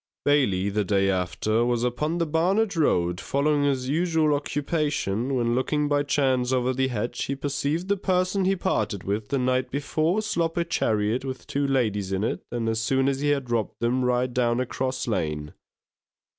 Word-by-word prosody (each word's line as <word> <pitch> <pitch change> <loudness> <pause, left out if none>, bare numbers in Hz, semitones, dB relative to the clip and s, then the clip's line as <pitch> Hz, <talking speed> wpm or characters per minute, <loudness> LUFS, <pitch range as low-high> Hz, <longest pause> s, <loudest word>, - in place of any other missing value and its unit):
Bailey, 110 -10 +2
the 105 +1 0
day 100 0 +2
after, 95 +5 0
was 120 -1 0
upon 150 +7 -1
the 170 - +1
Barnet 185 +7 +1
Road, 90 - +1
following 145 +3 +1
his 130 -2 0
usual 160 0 +2
occupation, 145 - -1
when 120 -1 +1
looking 150 +4 0
by 145 0 +2
chance 130 -3 +1
over 130 0 +1
the 130 +1 +1
hedge, 120 -2 -3
he 140 - -2
perceived 145 +5 -2
the 200 0 +1
person 185 0 +1
he 195 +1 +3
parted 125 - -1
with 105 +2 -2
the 140 - -1
night 130 0 0
before, 155 - 0
slop 170 -5 -1
a 170 - +2
chariot 110 -7 0
with 130 -1 -6
two 140 0 -1
ladies 105 -8 0
in 95 +1 -1
it, 115 - -1
and 115 -2 -2
as 110 0 0
soon 135 +3 +1
as 135 -1 0
he 145 +1 0
had 135 -4 -1
robbed 115 -3 -1
them, 125 +2 +1
ride 125 0 +1
down 120 -1 +1
a 130 - 0
cross 130 +1 -3
lane. 75 -8 -2
130 Hz, 185 wpm, -25 LUFS, 115-150 Hz, -, he